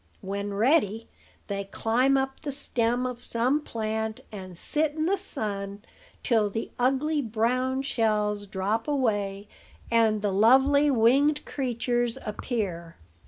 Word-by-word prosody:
When 200 +1 -4
ready, 225 -2 +2 0.4
they 200 -1 -3
climb 245 +7 +2
up 265 0 -2
the 285 - -3
stem 245 -3 0
of 250 -1 -4
some 250 +7 +1
plant, 220 -3 -3
and 185 -4 -8
sit 295 - +1
in 310 0 -1
the 380 +4 +2
sun 205 - -4 0.4
till 220 -4 +2
the 225 +3 -4
ugly 275 +5 +1
brown 255 +3 0
shells 210 -5 0
drop 200 +5 -2
away, 205 -8 -1 0.4
and 220 -2 +3
the 205 -2 0
lovely 265 +8 +5
winged 275 +5 +3
creatures 240 -2 -1
appear. 195 -7 -4
230 Hz, 125 wpm, -27 LUFS, 210-265 Hz, 0.4 s, lovely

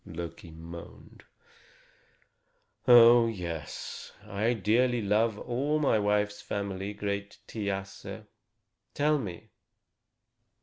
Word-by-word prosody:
Loki 85 0 -8
moaned: 85 +1 -11 1.6
"Oh, 120 -1 +8
yes! 85 - -6
I 105 +3 0
dearly 115 +3 +2
love 105 +2 +2
all 135 +7 -1
my 140 -7 +2
wife's 105 0 0
family, 100 -1 -4
great 100 0 -4
Thiasse. 100 -3 -5
105 Hz, 75 wpm, -29 LUFS, 95-115 Hz, 1.6 s, Oh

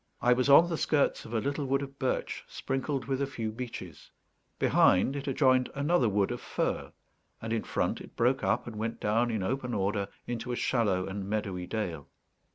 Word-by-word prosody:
I 125 - +4
was 130 +2 +1
on 160 +5 +8
the 165 -2 -2
skirts 145 -3 +1
of 110 - -9
a - - +3
little 140 +3 -2
wood 135 +1 +1
of 140 0 -9
birch, 130 - -1
sprinkled 135 0 -3
with 135 +1 -1
a 140 - +1
few 115 -5 -4
beeches; 110 - -8 0.5
behind, 95 +9 +4
it 140 0 -5
adjoined 130 -2 +3
another 140 -3 +2
wood 100 -1 +1
of - - -4
fir; - - -2 0.5
and 110 0 -3
in 115 - 0
front, - - -1
it - - -12
broke 125 +3 +2
up - - +1
and 115 -3 -7
went 115 +2 -3
down 115 +3 +1
in 110 -4 -1
open 125 +3 -2
order 100 0 0 0.2
into 120 +1 -4
a - - -1
shallow 105 -8 +1
and 95 0 -5
meadowy 95 -4 -2
dale. 85 -10 -3
120 Hz, 195 wpm, -30 LUFS, 105-135 Hz, 0.5 s, on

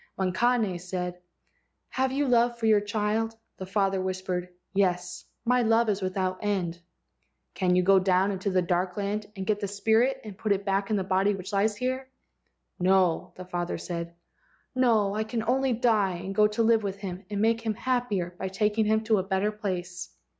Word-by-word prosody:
When 185 -1 -1
Kane 225 -3 +1
said, 180 0 -4 0.7
"Have 260 0 0
you 280 +1 0
love 240 -1 +3
for 230 - -3
your 215 -2 +5
child?" 215 +2 -1 0.2
the 190 - -7
father 195 -1 +1
whispered: 185 -1 -3 0.2
"Yes. 180 -2 0 0.2
1 250 +2 +2
My 250 - +3
love 225 0 +3
is 200 -1 0
without 185 0 -1
end." 185 -5 -1 0.7
"Can 180 -2 +1
you 180 - +3
go 195 +1 +6
down 185 +1 +2
into 195 +1 -2
the 185 -1 +2
dark 180 +1 -1
land 205 +1 -2
and 190 -1 -5
get 210 +1 +1
that 200 - -2
spirit 220 +6 +2
and 210 -3 -8
put 215 -2 +2
it 200 0 -4
back 195 0 0
in 215 - +1
the 195 - 0
body 190 +2 +2
which 190 +2 -8
lies 205 +1 +1
here?" 260 +2 -2 0.7
"No," 185 -2 +2
the 185 - -9
father 175 -1 -3
said, 170 -1 -5 0.6
"no, 225 -6 +3
I 215 +1 0
can 220 +1 -3
only 260 +3 +1
die 220 -6 +2
and 190 +3 -5
go 210 +1 +5
to 210 +2 0
live 225 0 +4
with 200 -1 -3
him 190 -1 -6
and 205 -1 -3
make 225 +2 +2
him 220 -2 -2
happier 220 -8 -1
by 190 - -2
taking 210 +3 +1
him 220 +1 +2
to 220 -2 +2
a - - -1
better 190 +2 0
place." 185 -4 -4
200 Hz, 195 wpm, -27 LUFS, 185-220 Hz, 0.7 s, go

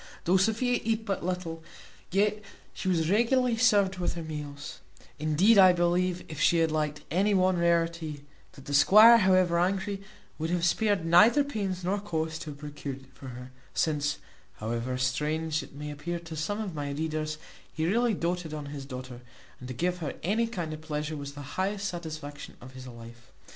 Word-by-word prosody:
Though 180 +3 +3
Sophia 230 +5 +1
eat 220 0 -1
but 195 -5 -2
little, 170 -2 -4 0.5
yet 210 +2 +1 0.3
she - - -5
was 170 -2 +1
regularly 240 +3 +3
served 205 -5 +3
with 175 - -1
her 170 - -5
meals; 150 -2 -7 0.4
indeed, 170 +9 +4
I 185 -1 +8
believe, 175 +1 +1
if 155 - -8
she 170 - +4
had 165 -1 +2
liked 150 -1 -1
any 200 +5 +2
one 185 -1 +3
rarity, 165 -3 0 0.3
that 135 - -14
the 145 - -5
squire, 215 +11 +8
however 185 -4 +3
angry, 195 +2 -1 0.4
would 160 +1 -2
have 175 -1 0
spared 205 -1 +1
neither 215 - +6
pains 200 -9 -3
nor 195 +3 0
cost 160 -5 -3
to 155 - -6
have 145 - -8
procured 145 -2 -7
it 130 0 -21
for 130 +1 -11
her; 125 0 -9 0.2
since, 145 -2 0 0.4
however 120 +3 -3
strange 150 +5 -1
it - - -13
may 150 +1 -6
appear 160 +4 -4
to 165 -1 -9
some 160 +8 -2
of 205 -5 -4
my 145 -2 -4
readers, 155 +1 -3 0.3
he 160 - -2
really 230 +5 +2
doated 170 -2 -2
on 150 -1 -6
his 140 -2 -6
daughter, 130 -2 -8 0.4
and 125 - -9
to 130 - -5
give 180 +6 -1
her 155 -4 -4
any 220 +6 +1
kind 175 -9 -4
of 155 - -8
pleasure 150 0 -4
was 140 -1 -6
the 145 0 -8 0.2
highest 200 +1 -1
satisfaction 155 -5 -7
of 130 - -12
his 130 0 -10
life. 115 0 -12
165 Hz, 185 wpm, -28 LUFS, 150-190 Hz, 0.5 s, I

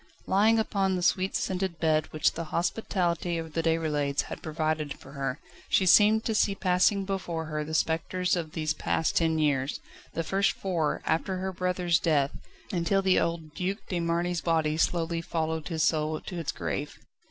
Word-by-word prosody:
Lying 215 +4 +4
upon 195 -3 +1
the 180 - -2
sweet 185 +2 +1
scented 185 -2 -1
bed 155 -2 +2
which 155 - +2
the 165 - -5
hospitality 175 -1 -1
of 160 -1 -6
the 165 - 0
Déroulèdes 155 -4 +1
had - - -8
provided 155 -1 -2
for 135 - -14
her, 135 0 -3 0.3
she 190 - +3
seemed 210 +4 +6
to 225 - 0
see 205 -1 +2
passing 190 +1 +2
before 175 -4 -3
her 155 -1 -3
the 160 +1 -4
spectres 165 +4 +1
of 165 -3 -4
these 155 -1 -1
past 160 0 -1
ten 160 -1 +2
years 145 -3 0 0.4
the 165 - 0
first 195 +4 +1
four, 170 -6 -1
after 175 +4 0
her 190 +1 -2
brother's 180 -2 +1
death, 145 -4 +2 0.4
until 190 +2 +1
the 190 -1 +4
old 165 -2 -2
Duc 185 +3 -2
de 180 - -1
Marny's 170 +1 0
body 160 -2 +1
slowly 165 0 0
followed 160 -1 -2
his 160 -3 -1
soul 155 -1 +1
to 180 - -6
its 165 - -2
grave. 145 +1 -4
165 Hz, 175 wpm, -28 LUFS, 155-185 Hz, 0.4 s, seemed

